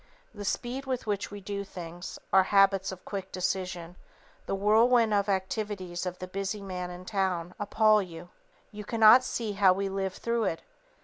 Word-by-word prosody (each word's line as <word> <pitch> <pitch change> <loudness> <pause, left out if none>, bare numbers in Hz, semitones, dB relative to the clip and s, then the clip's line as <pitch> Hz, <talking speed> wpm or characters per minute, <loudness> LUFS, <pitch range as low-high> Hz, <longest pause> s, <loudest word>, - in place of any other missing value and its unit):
The 205 -2 -7
speed 255 +6 -3
with 255 -2 -2
which 205 -2 -2
we 205 0 -8
do 200 +1 -4
things, 175 -2 -8 0.2
our 190 - +8
habits 195 0 +3
of 185 -1 -10
quick 195 -2 -5
decision, 180 -2 -3 0.5
the - - -1
whirlwind 220 +3 +4
of 200 0 +1
activities 190 -2 -2
of 180 0 -4
the 185 - -7
busy 195 +2 -4
man 180 -2 -5
in 180 +1 -9
town, 185 -4 -1
appal 215 +1 +3
you. 175 -2 -9 0.4
You 210 -1 -8
cannot 225 +3 +6
see 225 -4 -3
how 195 -2 +4
we 195 +1 -2
live 195 -1 -3
through 235 -1 -1
it. 165 - -2
195 Hz, 175 wpm, -28 LUFS, 185-210 Hz, 0.5 s, our